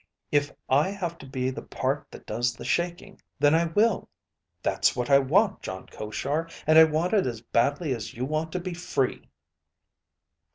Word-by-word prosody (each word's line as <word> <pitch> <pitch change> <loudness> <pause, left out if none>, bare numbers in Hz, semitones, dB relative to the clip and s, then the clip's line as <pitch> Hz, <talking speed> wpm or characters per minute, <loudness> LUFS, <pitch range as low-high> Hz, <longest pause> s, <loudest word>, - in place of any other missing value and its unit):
If 145 0 +2 0.2
I 145 +7 +3
have 175 -4 -4
to 135 - -11
be 130 -1 -2
the 130 - -6
part 135 +3 -2
that - - -12
does 120 +2 -1
the - - -9
shaking, 175 0 -2 0.2
then 145 +1 +4
I 165 +1 +4
will. 205 +6 +1 0.5
That's - - +2
what 125 +2 -2
I 140 - +8
want, 190 +10 +2
Jon 95 0 -6
Koshar, 145 +9 -3 0.2
and 155 +1 +7
I 160 - +10
want 160 +4 0
it 200 -8 +3
as 115 -3 -4
badly 140 +6 +1
as 115 -4 -6
you 125 +2 -2
want 155 +3 -2
to 180 - -1
be 180 0 -5
free." 155 -6 -2
145 Hz, 180 wpm, -26 LUFS, 130-170 Hz, 0.5 s, I